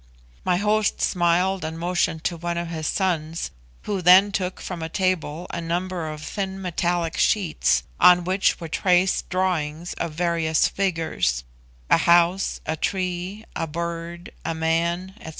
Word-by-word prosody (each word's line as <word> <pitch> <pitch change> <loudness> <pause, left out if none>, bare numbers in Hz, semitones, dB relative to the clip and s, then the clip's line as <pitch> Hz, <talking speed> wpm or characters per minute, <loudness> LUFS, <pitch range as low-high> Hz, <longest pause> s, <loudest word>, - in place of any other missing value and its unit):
My 180 -1 +2
host 210 +1 +1
smiled 180 +1 +1
and 160 +1 -4
motioned 170 -2 -1
to 175 - -1
one 170 +1 -3
of 170 0 -3
his 160 -2 -3
sons, 165 - -1 0.3
who 200 -3 -2
then 185 +3 +7
took 185 -2 -2
from 180 -3 -6
a 160 - -4
table 175 -3 -1
a 170 - -4
number 175 0 -2
of 155 0 -7
thin 195 +1 -4
metallic 175 -2 -1
sheets 170 - +2 0.2
on 180 0 +7
which 185 +2 +1
were 165 - -6
traced 180 +3 +2
drawings 175 -3 -1
of 165 - -3
various 165 -1 +1
figures 165 - -1 0.4
a - - +5
house, 175 +2 +3
a 160 - -1
tree, 185 +4 -3
a 165 - -2
bird, 170 +1 -5
a 165 - -2
man, 170 +3 0
&c. - - -7
175 Hz, 150 wpm, -24 LUFS, 165-185 Hz, 0.4 s, then